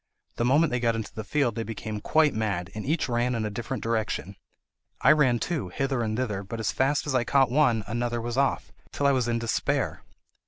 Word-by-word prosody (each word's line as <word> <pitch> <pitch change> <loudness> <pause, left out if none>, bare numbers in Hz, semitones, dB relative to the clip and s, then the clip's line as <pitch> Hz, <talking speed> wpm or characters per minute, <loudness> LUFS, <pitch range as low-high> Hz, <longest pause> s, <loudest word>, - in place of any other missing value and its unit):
The 120 - +1
moment 145 +6 +3
they 125 - 0
got 115 -1 +1
into 110 -2 -5
the 110 - -5
field 130 +1 +1
they 115 - -3
became 110 -1 -5
quite 155 +2 +3
mad, 100 -5 -2
and 105 0 -5
each 150 0 0
ran 120 0 0
in 110 -2 -1
a 105 - -3
different 120 +2 -4
direction. 110 -3 -2 0.7
I 135 - +6
ran 135 -6 +4
too, 145 - -2
hither 135 +5 -1
and 110 -1 -1
thither, 105 -6 -2
but 105 +4 -7
as 110 - 0
fast 140 +4 +1
as 145 - -2
I 130 -2 +2
caught 135 +1 +3
one, 125 -6 +3
another 120 +2 -2
was 120 0 -4
off, 135 0 0 0.2
till 145 - -2
I 140 - +6
was 130 -3 +1
in 120 -1 +1
despair. 115 -2 -1
120 Hz, 225 wpm, -27 LUFS, 110-135 Hz, 0.7 s, I